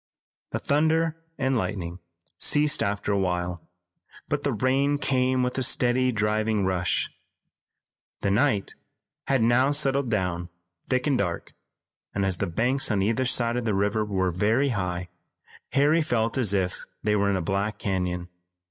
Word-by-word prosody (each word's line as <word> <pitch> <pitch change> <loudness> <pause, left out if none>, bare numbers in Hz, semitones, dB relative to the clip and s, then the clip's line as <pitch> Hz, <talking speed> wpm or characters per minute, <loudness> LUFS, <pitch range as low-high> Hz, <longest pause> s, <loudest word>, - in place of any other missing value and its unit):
The - - -1
thunder 160 +2 +1 0.2
and 135 -2 0
lightning 90 -6 -3 0.4
ceased 150 0 +3
after 100 0 -1
a 100 - +1
while, 90 -2 -2 0.7
but - - -1
the - - 0
rain 135 +5 +1
came 130 -2 +1
with 125 +1 -1
a - - 0
steady, 125 0 +3
driving 105 -1 0
rush. 95 -2 0 1.1
The 100 - +1
night 105 -2 +1 0.5
had 135 -4 +2
now 120 +4 +4
settled 140 -3 +1
down 90 -5 -1 0.4
thick 130 -1 +1
and 140 -4 +2
dark, 90 -4 -3 0.6
and, 100 0 +1
as 95 -2 0
the 100 - 0
banks 125 +10 0
on 100 -3 +1
either 115 +5 +1
side 120 -1 +2
of 120 - -2
the 110 -3 +1
river 105 +2 +1
were 95 -3 0
very 110 +10 +2
high, 90 -5 -3 0.6
Harry 145 +4 +4
felt 115 -6 0
as 120 -7 +3
if 95 -3 -1 0.2
they 105 0 +2
were 100 -1 +2
in 100 - +1
a 95 - -1
black 100 +4 -1
canyon. 90 -3 -2
110 Hz, 155 wpm, -26 LUFS, 95-130 Hz, 1.1 s, now